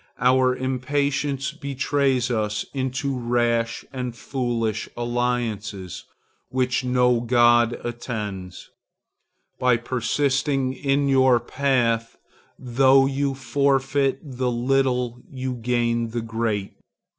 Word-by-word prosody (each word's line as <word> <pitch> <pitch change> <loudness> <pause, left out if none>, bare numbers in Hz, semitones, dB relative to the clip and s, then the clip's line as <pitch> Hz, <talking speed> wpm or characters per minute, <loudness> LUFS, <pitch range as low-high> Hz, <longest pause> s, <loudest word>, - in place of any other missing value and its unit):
Our 130 +1 +3
impatience 135 +2 -1
betrays 135 -2 0
us 110 -2 -1
into 135 +1 -2
rash 120 -1 0
and 125 -2 -4
foolish 115 -2 -2
alliances 120 -6 -2 0.4
which 130 -1 0
no 125 -1 +3
god 120 0 +4
attends. 105 -6 -6 0.9
By 125 -2 +3
persisting 130 +2 0
in 140 +1 0
your 130 -2 +4
path, 120 -3 0 0.4
though 135 +2 +4
you 135 0 -1
forfeit 135 +1 +1
the 130 -3 -2
little 125 0 0
you 130 -1 -4
gain 120 -1 0
the 120 +1 -3
great. 115 -3 -2
125 Hz, 95 wpm, -23 LUFS, 120-135 Hz, 0.9 s, god